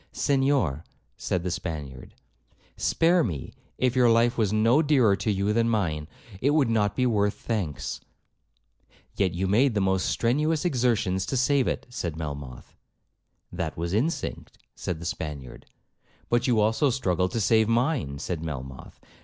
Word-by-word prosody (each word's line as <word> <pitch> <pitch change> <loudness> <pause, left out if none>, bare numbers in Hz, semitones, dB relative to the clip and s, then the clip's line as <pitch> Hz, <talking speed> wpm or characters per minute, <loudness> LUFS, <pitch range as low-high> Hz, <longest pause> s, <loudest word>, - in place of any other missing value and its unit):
'Senhor,' 135 - +1 0.3
said 90 -2 -2
the 90 - -2
Spaniard, 80 -8 -6 0.6
'spare 170 +1 +2
me; 80 - -4 0.2
if 130 -1 +1
your 125 -2 +5
life 115 +1 +3
was 110 -4 +1
no 115 +7 +4
dearer 135 -10 +4
to 110 - -3
you 100 +1 +1
than 115 +1 +2
mine, 80 -9 -1 0.3
it 140 +3 +2
would 135 -7 +3
not 105 -2 +1
be 125 - +1
worth 105 -3 +1
thanks.' 95 -11 -3 1.2
'Yet 95 -3 0
you 95 +2 -1
made 115 +6 +3
the - - +2
most 95 -1 +1
strenuous 150 +7 +1
exertions 115 - +1
to 135 - -1
save 130 +1 +2
it,' - - -2
said 90 -10 -4
Melmoth. 70 -5 -7 0.8
'That 85 -3 -4
was 85 +2 -3
instinct,' 135 +11 -2 0.2
said 85 -3 -4
the 85 - -8
Spaniard. 75 -6 -6 0.6
'But 120 +2 +1
you 120 -3 +3
also 110 +7 +2
struggled 90 -8 0
to 115 - 0
save 110 +1 +3
mine,' 120 - 0
said 80 +2 -4
Melmoth. 65 -5 -7
105 Hz, 155 wpm, -26 LUFS, 85-125 Hz, 1.2 s, your